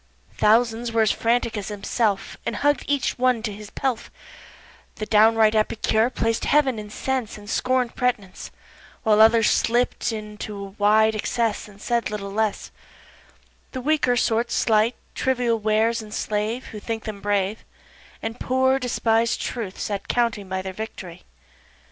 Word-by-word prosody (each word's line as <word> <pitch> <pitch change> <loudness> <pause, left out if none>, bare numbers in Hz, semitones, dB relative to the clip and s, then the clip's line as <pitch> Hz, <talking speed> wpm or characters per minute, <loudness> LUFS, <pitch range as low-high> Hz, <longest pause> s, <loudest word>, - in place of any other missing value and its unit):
Thousands 230 +2 +3
there 230 - -5
were 225 - +4
as 215 - +3
frantic 235 0 0
as 205 -2 -4
himself 205 0 -1
And - - -3
hugg'd 290 0 +1
each 285 -3 0
one 250 -3 +2
his 210 -2 -6
pelf, 255 -1 -2 0.9
The 215 - -4
downright 220 0 +5
epicure 220 +1 +1
plac'd 225 -3 -1
heav'n 275 -6 +2
in 210 0 -8
sense 255 0 -3
And 205 -1 -13
scorn'd 250 +1 0
pretnece 215 -7 -2 0.5
While 215 -2 +4
others 225 0 +6
slipt 240 +1 +1
into 210 -1 -6
a 200 0 -7
wide 215 +2 +3
excess 215 0 -1
Said 235 +3 -1
little 200 -2 -5
less; 215 0 -1 1.0
The 260 - -4
weaker 285 -3 +2
sort 235 0 +1
slight, 225 0 +2 0.2
trivial 245 -3 0
wares 220 +2 +1
enslave 215 +2 -3
Who 215 - -7
think 225 +1 -4
them 210 -2 -6
brave, 205 +1 -1 0.6
And 225 +2 -4
poor, 260 +1 +2
despised 230 -2 +1
Truth 215 -6 -5
sat 200 -2 -3
counting 230 -5 0
by 190 0 -2
Their 190 0 -5
victory. 185 -4 -8
225 Hz, 145 wpm, -23 LUFS, 210-240 Hz, 1.0 s, others